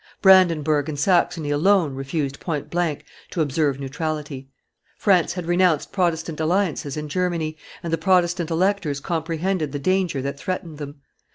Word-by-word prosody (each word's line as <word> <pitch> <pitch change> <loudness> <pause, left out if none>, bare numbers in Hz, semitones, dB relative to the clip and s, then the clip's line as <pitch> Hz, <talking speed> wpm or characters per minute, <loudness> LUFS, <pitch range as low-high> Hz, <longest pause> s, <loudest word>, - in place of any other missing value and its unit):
Brandenburg 160 -6 +4
and 150 - -4
Saxony 165 -2 +1
alone 165 0 +3
refused 135 +1 -3
point 150 -5 -4
blank 170 -4 -1 0.2
to - - -5
observe 145 -2 +1
neutrality; 145 -1 -4 0.5
France 185 -5 +3
had 180 -2 -5
renounced 175 -3 +2
Protestant 165 -4 -1
alliances 160 -4 0
in 150 0 -4
Germany, 165 -1 -1 0.3
and 165 -1 -3
the 165 - +1
Protestant 175 -1 +2
electors 170 -4 0
comprehended 165 0 -2
the - - -1
danger 185 -1 0
that 140 0 -4
threatened 170 -4 -4
them. 145 -1 -8
160 Hz, 145 wpm, -23 LUFS, 145-180 Hz, 0.5 s, Brandenburg